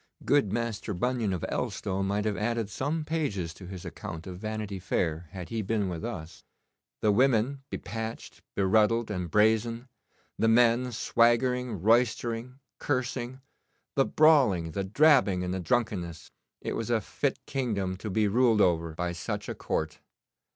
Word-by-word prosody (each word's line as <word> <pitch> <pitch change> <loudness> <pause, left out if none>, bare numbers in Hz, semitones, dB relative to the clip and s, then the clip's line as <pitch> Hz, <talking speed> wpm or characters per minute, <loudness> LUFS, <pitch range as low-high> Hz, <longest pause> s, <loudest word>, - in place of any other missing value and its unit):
Good 140 -9 +3
Master 115 -2 -2
Bunyan, 120 +1 0
of 90 -3 -2
Elstow, 95 0 -2
might 100 +2 0
have 105 -1 0
added 110 +1 -1
some 150 +6 -2
pages 110 - -2
to 90 +1 -11
his 95 -1 -8
account 80 0 -7
of 90 -1 -7
Vanity 110 -2 -4
Fair 85 -2 -1
had 90 -3 -8
he 115 -1 -2
been 105 -1 0
with 85 -3 -5
us. 80 +2 -6 0.6
The 105 - +4
women, 130 +3 +2
be - - -3
patched, 115 0 -6
be 100 - +1
ruddled, 110 +3 +3
and 90 -4 -3
brazen; 110 +5 +2 0.5
the 115 - +3
men 120 +2 +4
swaggering, 120 -2 +2
roistering, 120 +2 +1 0.2
cursing 130 -1 -2 0.5
the 135 - +3
brawling, 130 - +4
the 100 +5 -2
drabbing, 110 -4 +4
and 90 0 -2
the 95 - -2
drunkenness! 90 -7 -2 0.3
It - - -3
was - - -3
a - - +3
fit - - -2
kingdom 105 -9 -1
to 105 - -6
be 105 +2 +2
ruled 115 +1 +3
over 85 -4 +2
by 90 +1 -2
such 85 -2 -4
a - - -3
court. 80 -1 -3
110 Hz, 160 wpm, -28 LUFS, 95-120 Hz, 0.6 s, The